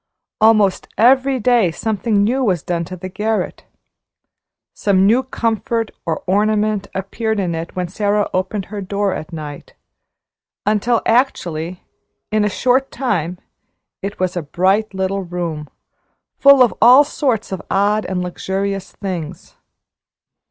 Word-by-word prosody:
Almost 215 -3 +4
every 260 +3 +4
day 235 -4 +3
something 205 +3 0
new 255 +5 +1
was 180 - 0
done 170 -1 -2
to 185 - -7
the 185 - -6
garret. 215 +4 -2 1.1
Some 195 -2 +2
new 230 +6 +4
comfort 230 -3 -2 0.2
or 160 -1 -2
ornament 210 +1 +1
appeared 215 +3 -2
in 180 -3 -1
it 165 +1 -5
when 180 -1 -2
Sara 205 +2 0
opened 185 +2 -2
her 205 - -4
door 200 0 -1
at 155 - -6
night, 150 -3 -8 0.9
until 215 +3 +1
actually, 180 - 0 0.5
in 215 -1 +2
a 210 - +2
short 255 +6 +1
time 180 - -2 0.6
it 200 +2 -5
was 185 -1 -1
a 175 - -1
bright 190 +7 0
little 190 +1 -1
room, 170 -4 -5 0.7
full 280 -2 +7
of 240 - +2
all 250 +5 +8
sorts 255 -8 -1
of 190 - -4
odd 205 +2 +2
and 180 -1 -2
luxurious 190 +2 -3
things. 180 -4 -6
200 Hz, 135 wpm, -18 LUFS, 180-225 Hz, 1.1 s, all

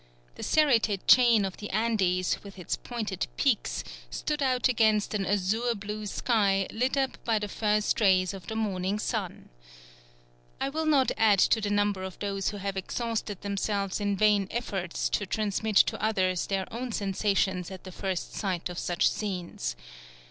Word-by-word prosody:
The - - -11
serrated 230 -10 +2
chain 235 -5 +6
of 190 - -5
the 210 - -7
Andes, 195 -4 +1
with 200 -1 -11
its 180 - -2
pointed 220 -6 -4
peaks, - - +1 0.3
stood 295 - -3
out 255 -2 +2
against 220 -4 +2
an 200 -2 -1
azure 210 +5 +1
blue 210 +1 -5
sky 200 -3 +1
lit 255 +4 0
up 270 -1 -1
by 225 -2 +1
the 210 0 -2
first 210 +1 0
rays 185 -2 +4
of 185 -4 -10
the 220 - -4
morning 200 -2 -1
sun. - - -4 1.1
I 270 - -1
will 315 +2 -2
not 280 -4 +4
add 215 -3 +5
to 220 +4 +4
the 205 - -1
number 205 -1 +1
of 190 -1 -6
those 195 -1 -2
who 205 - -6
have 195 0 -4
exhausted 220 0 -3
themselves 200 -1 -2
in 205 -1 0
vain 205 -1 +3
efforts 195 -7 -2
to 205 - -1
transmit 215 +1 -1
to - - +4
others 185 -5 +1
their 195 -1 -1
own 245 +1 -4
sensations 195 -3 0
at 190 -2 -9
the 185 - -9
first 185 -1 -4
sight 185 -4 -2
of 175 - -5
such 175 -1 +1
scenes. 175 - -3
205 Hz, 170 wpm, -28 LUFS, 190-220 Hz, 1.1 s, chain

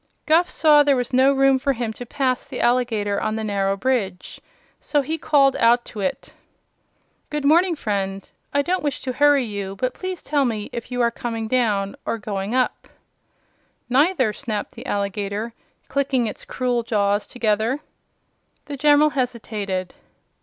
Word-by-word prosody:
Guph 330 +3 +4
saw 300 -2 +5
there 285 -1 +4
was 245 0 -2
no 260 +2 +5
room 270 -1 +3
for 275 +1 +1
him 235 -3 -3
to 245 +2 -9
pass 255 0 -1
the - - -6
alligator 225 -5 +1
on 215 0 -1
the 220 - -3
narrow 195 -2 0
bridge, 195 -6 -2 0.4
so 290 -2 0
he 320 +4 -3
called 280 -3 +3
out 240 +1 +4
to 215 - -9
it: 270 +7 -3 1.0
"Good 295 -1 -3
morning, 340 +4 +4
friend. 195 -6 -3 0.2
I 285 0 +2
don't 365 +4 0
wish 290 -2 -2
to 255 - -3
hurry 285 -1 +4
you, 200 -3 -5
but 255 +4 -2
please 370 -2 -6
tell 285 -1 +1
me 220 -5 -2
if 235 0 -6
you 245 0 -1
are 235 0 +3
coming 230 -2 -4
down, 210 -5 0
or - - -2
going 200 +1 -3
up?" 255 -1 0 1.0
"Neither," 265 - +3
snapped 215 -5 -4
the - - -10
alligator, 200 +2 -2 0.3
clicking 270 -3 0
its 215 - -5
cruel 250 -2 -1
jaws 205 -2 0
together. 225 +2 0 0.9
The 285 - -6
General 295 +2 +5
hesitated. 215 -8 -3
245 Hz, 160 wpm, -22 LUFS, 210-275 Hz, 1.0 s, saw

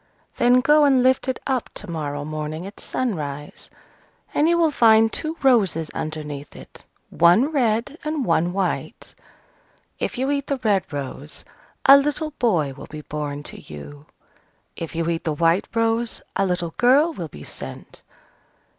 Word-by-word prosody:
Then 245 +1 +5
go 300 +3 +5
and 265 -3 +4
lift 260 +1 +3
it 260 - -1
up 260 -3 -1
to 210 - -7
morrow 145 -4 -4
morning 155 +2 -5
at 200 +1 -10
sunrise, 150 - -4 0.6
and 300 +3 +3
you 340 - +3
will 330 -2 +3
find 225 -4 +5
two 320 +1 -3
roses 195 - +3
underneath 150 -2 -6
it, - - -13 0.3
one 180 - +4
red 245 +1 0
and 305 -3 -2
one 170 0 +2
white. 190 0 -3 0.9
If - - -3
you 265 +3 0
eat 280 -1 -1
the 280 - -1
red 200 -6 +1
rose, 140 +1 -6 0.4
a 275 +1 +10
little 295 +2 -1
boy 170 - +1
will 135 - -11
be 155 0 -8
born 145 -1 -5
to - - -8
you: 140 - -11 0.7
if 165 0 -6
you 165 0 -1
eat 165 -1 -1
the 155 - -1
white 165 +4 +2
rose, 230 +1 0
a 195 - +1
little 175 -2 -2
girl 280 +7 +4
will 170 - -5
be 75 - -12
sent. - - -9
195 Hz, 160 wpm, -22 LUFS, -, 0.9 s, a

